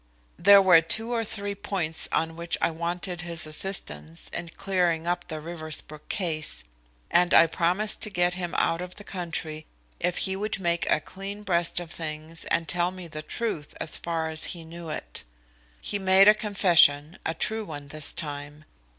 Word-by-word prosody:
There 200 +2 +8
were 175 -3 +7
two 220 +8 0
or 230 -1 0
three 205 -1 -2
points 195 -6 +1
on 165 0 0
which 170 0 -1
I - - +1
wanted 175 +2 -3
his 170 -2 -3
assistance 85 - -1
in 170 - -5
clearing 175 -3 0
up 175 +1 -1
the 155 -3 -5
Riversbrook 155 -2 -6
case, 160 - -2 0.5
and 175 0 +4
I - - +9
promised 180 +6 +1
to - - 0
get 175 -2 +1
him 180 -1 -4
out 165 +1 +1
of 180 0 -7
the 205 - -9
country 165 -5 -5 0.3
if 180 0 0
he 190 - -1
would 205 +1 -2
make 170 -2 0
a 155 - +3
clean 200 +4 -8
breast 175 -3 +1
of 170 -2 -8
things 160 0 -6
and 165 -1 0
tell 175 0 +2
me 185 -1 -9
the 155 -1 -7
truth 160 -4 -4
as 155 - +1
far 165 -1 -2
as 160 0 +1
he 165 - -9
knew 165 0 -9
it. 155 - -5 0.6
He 205 - -3
made 190 +1 +6
a 210 - +10
confession 175 -7 +3
a 160 - -2
true 220 +6 -1
one 145 -6 -8
this 155 0 -1
time. 145 0 -5
170 Hz, 180 wpm, -26 LUFS, 160-190 Hz, 0.6 s, a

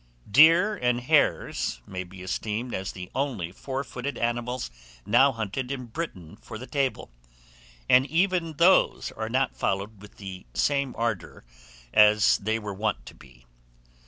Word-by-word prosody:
DEER 165 - +6
AND 125 0 0
HARES - - +1
may 95 -1 -5
be 90 +1 -12
esteemed 110 +5 -3
as 95 0 -3
the 90 -1 -9
only 120 -12 -2
four 135 +7 -5
footed 135 +1 -6
animals 120 - -2 0.3
now 120 +7 +5
hunted 120 +3 -4
in 130 -2 -4
Britain 110 - -7
for 110 - -9
the 125 - -8
table; 135 - -2 0.8
and 130 +2 +5
even 170 +1 +1
those 170 +5 +3
are 110 0 -5
not 130 +3 0
followed 100 +1 -2
with 105 -1 -15
the 95 -6 -9
same 140 -2 0
ardour 115 - -3 0.5
as 105 0 +5
they 110 +2 -1
were 105 -2 -6
wont 95 - -2
to - - -11
be. 60 -2 -19
115 Hz, 150 wpm, -26 LUFS, 100-135 Hz, 0.8 s, DEER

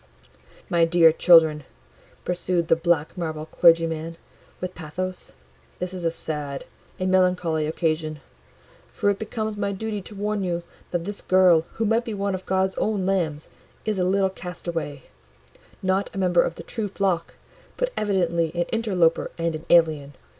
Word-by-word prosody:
"My 170 -2 +2
dear 165 -1 +6
children," 160 -2 +5 0.6
pursued 175 -1 -1
the - - +6
black 165 -2 0
marble 160 -3 -4
clergyman, 165 -1 +2 0.4
with 185 0 -4
pathos, 180 +3 -6 0.4
"this 180 +1 -4
is 180 -2 -6
a 165 - +2
sad, 150 -4 -4 0.3
a 185 - -1
melancholy 180 -4 +2
occasion; 155 -1 -1 0.7
for 205 - +1
it 200 - -4
becomes 220 -1 -3
my 200 -1 -1
duty 210 +1 -4
to 205 - -11
warn 205 0 -1
you, 175 -2 -2 0.3
that 175 -1 -2
this 200 +3 -5
girl, 180 -3 +4
who 225 - -1
might 225 +2 +2
be 225 -3 -5
one 200 0 -1
of 185 0 -6
God's 190 0 +1
own 210 -3 0
lambs, 165 -6 -1 0.4
is 215 -3 -1
a - - +2
little 190 +1 +2
castaway: 170 -6 -5 0.8
not 190 +1 +1
a - - -5
member 180 -2 +3
of 165 - -2
the - - -9
true 220 -3 -3
flock, 190 -3 -1 0.4
but - - -1
evidently 170 -6 +1
an 175 0 +1
interloper 190 -8 +1
and 165 -1 -1
an 155 0 -7
alien. 155 -5 +3
180 Hz, 160 wpm, -24 LUFS, 165-195 Hz, 0.8 s, dear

